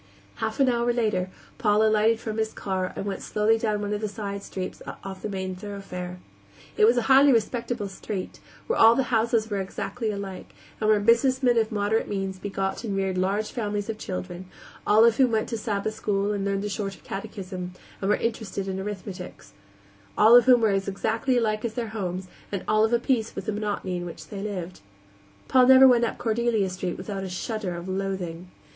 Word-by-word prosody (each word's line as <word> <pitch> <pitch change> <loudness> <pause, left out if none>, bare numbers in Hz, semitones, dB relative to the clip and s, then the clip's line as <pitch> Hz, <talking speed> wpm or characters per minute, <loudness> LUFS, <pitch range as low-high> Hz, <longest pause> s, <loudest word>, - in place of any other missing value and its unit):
Half 220 +3 -3
an 270 - +5
hour 240 -1 +2
later 210 -6 0 0.3
Paul 210 -2 +3
alighted 220 +1 +3
from 220 -1 -4
his 220 0 -1
car 190 -2 -2
and - - -4
went 195 -1 -3
slowly 220 +1 +1
down 215 -2 0
one 205 0 -2
of 210 - -2
the 215 - -1
side 200 -1 -5
streets 185 -2 -6 0.2
off 190 -1 -7
the 215 - -4
main 190 -2 -4
thoroughfare. 180 -2 -7 0.6
It 210 - +5
was 235 +3 +4
a 240 - +2
highly 270 +3 +6
respectable 235 -1 0
street, 195 0 -6 0.3
where 470 - -1
all 225 +1 +8
the 255 -1 -1
houses 225 -1 +2
were 200 - 0
exactly 195 +4 -4
alike, 200 -2 -6 0.2
and 215 - +1
where 215 -1 +5
businessmen 245 +3 +3
of 220 0 0
moderate 210 +1 0
means 195 -2 -3
begot 195 +1 -3
and 200 -4 -2
reared 190 -1 0
large 195 +4 0
families 205 -3 -3
of 215 - -9
children, 185 -1 -6 0.4
all 215 +2 +6
of 230 -1 +4
whom 260 -2 +5
went 220 -1 0
to 235 - -2
Sabbath 215 -1 -2
school 205 -2 -1
and 200 -1 -2
learned 200 0 -1
the 210 - -2
shorter 195 -1 -4
catechism, 190 -3 -6 0.3
and 195 - 0
were 210 - +5
interested 220 -4 -3
in 190 0 -3
arithmetic; 190 -2 -6 0.7
all 220 +3 +8
of 245 - +8
whom 250 -2 +6
were 220 - +4
as 195 0 0
exactly 225 +6 0
alike 215 -2 0
as 225 -2 -3
their 235 -3 -3
homes, 185 -4 -4 0.2
and 200 -2 -3
of 215 +1 +3
a 240 - +4
piece 235 -2 -1
with - - -5
the 215 - -1
monotony 205 -3 -2
in 175 0 -5
which 160 -2 -10
they 195 - -6
lived. 185 -4 -5 0.7
Paul 255 -1 +5
never 265 0 +9
went 240 -2 +5
up - - -4
Cordelia 225 -4 0
Street 185 -1 -4
without 195 -2 -5
a 190 - -4
shudder 190 0 -3
of 170 +1 -7
loathing. 185 -2 -3
210 Hz, 200 wpm, -26 LUFS, 195-225 Hz, 0.7 s, never